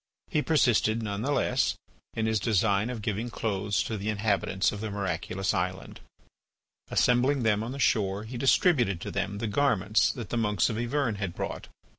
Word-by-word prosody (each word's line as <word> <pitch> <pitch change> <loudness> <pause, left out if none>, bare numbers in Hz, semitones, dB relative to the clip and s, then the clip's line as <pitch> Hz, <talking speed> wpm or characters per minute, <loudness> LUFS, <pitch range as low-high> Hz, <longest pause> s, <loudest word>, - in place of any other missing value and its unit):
He 150 - +2
persisted, 120 -7 +2
none 100 -1 -3
the 140 +5 -1
less, - - +1 0.4
in 110 - 0
his 110 -1 +1
design 105 +1 +1
of 115 -4 -5
giving 110 +3 -2
clothes 105 -3 -1
to 110 - -4
the 105 +2 -3
inhabitants 100 -2 0
of 105 - -6
the 110 - -3
miraculous 95 -1 -2
island. 90 -1 -3 0.9
Assembling 125 +2 +2
them 105 -2 +2
on 115 +2 -4
the 135 - -6
shore, 105 -6 +1
he 115 +3 -8
distributed 120 - +3
to - - -5
them 100 0 -2
the 115 - -3
garments 110 -3 +2
that 120 -6 -7
the 120 - -1
monks 105 -2 +1
of 110 - -4
Yvern 120 -2 -1
had 95 -4 -4
brought. - - -5
110 Hz, 180 wpm, -28 LUFS, 100-120 Hz, 0.9 s, distributed